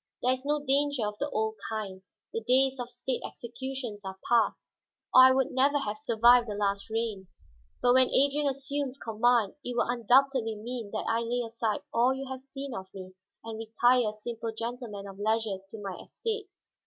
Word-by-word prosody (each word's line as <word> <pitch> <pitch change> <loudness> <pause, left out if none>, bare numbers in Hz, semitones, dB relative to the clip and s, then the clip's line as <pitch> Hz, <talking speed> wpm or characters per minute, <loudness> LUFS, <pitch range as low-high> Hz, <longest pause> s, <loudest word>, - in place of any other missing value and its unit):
There 250 +1 +4
is 260 0 -5
no 295 +1 -1
danger 280 -3 +2
of 210 0 -5
the 285 - -1
old 220 -2 -1
kind; 205 -4 -4 0.3
the 225 - -2
days 260 +3 +3
of 245 -1 -4
state 245 +1 -3
executions 245 -3 -6
are 190 0 -6
past, 235 -1 +2 0.5
or 255 0 +10
I 260 - +7
would 265 0 +1
never 275 +3 +3
have 215 -6 -3
survived 240 -2 +5
the 205 - -3
last 200 0 -1
reign. 220 -4 -2 0.6
But 245 0 +5
when 260 0 +5
Adrian 285 +2 +2
assumes 275 0 -2
command 230 -2 +2
it 245 -1 -4
will - - +2
undoubtedly 245 0 +3
mean 230 0 -6
that 215 - -3
I 225 0 +2
lay 240 +1 -1
aside 225 -2 -2
all 245 +3 +3
you 270 +1 -5
have 260 -1 -5
seen 275 0 -7
of 190 -3 -7
me, 185 -1 -9 0.3
and 225 -1 -6
retire 230 +1 +3
a - - -7
simple 225 +1 -5
gentleman 230 -2 -5
of 195 0 -10
leisure 215 -2 0
to 220 - -9
my 195 -2 -5
estates. 430 -4 -5
240 Hz, 190 wpm, -29 LUFS, 220-265 Hz, 0.6 s, or